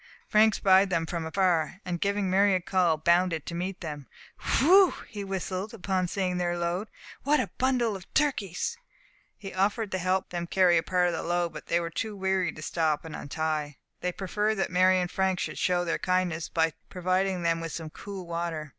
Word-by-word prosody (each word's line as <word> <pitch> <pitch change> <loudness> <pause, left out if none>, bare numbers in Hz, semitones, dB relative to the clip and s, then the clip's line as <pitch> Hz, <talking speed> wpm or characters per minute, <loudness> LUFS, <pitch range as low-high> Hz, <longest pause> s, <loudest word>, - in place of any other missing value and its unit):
Frank 215 0 +4
spied 190 0 +4
them 165 -3 0
from 165 -1 -4
afar, 175 -1 +1
and 175 -2 -3
giving 200 0 0
Mary 195 +1 +4
a - - +2
call, 180 -3 +1
bounded 170 0 +2
to - - -6
meet 180 +2 -4
them. 150 -5 -6 0.5
"Whew!" 365 +8 +6
he 205 -3 -6
whistled, 195 +2 -4
on 185 -2 +1
seeing 180 -1 -1
their 175 0 0
load, 175 +5 -2 0.3
"what 295 +2 +2
a - - -2
bundle 250 -4 +1
of 190 -1 -11
turkeys!" 280 - 0 0.6
He 195 -2 -8
offered 200 +3 0
to 185 - -1
help 185 +1 0
them 175 -1 -4
carry 180 -2 +4
a - - -1
part 180 +1 +1
of - - -3
the 165 - -2
load, 175 0 -1
but - - -9
they 170 - +2
were 170 -1 -4
too 215 +5 -3
weary 190 -1 0
to 155 - -10
stop 155 -2 0
and 160 - -7
untie. 150 -1 -3 0.2
They 180 - -1
preferred 210 +4 -1
that 190 - -1
Mary 185 +1 +4
and 180 -1 -2
Frank 190 -2 0
should - - -4
show 175 -1 +1
their 165 - -1
kindness, 180 -3 0
by 160 -1 +1 0.2
providing 185 0 0
them 165 0 +1
with 165 -1 -5
some 160 -1 -6
cool 195 0 -8
water. 170 -2 -4
180 Hz, 200 wpm, -28 LUFS, 170-195 Hz, 0.6 s, Whew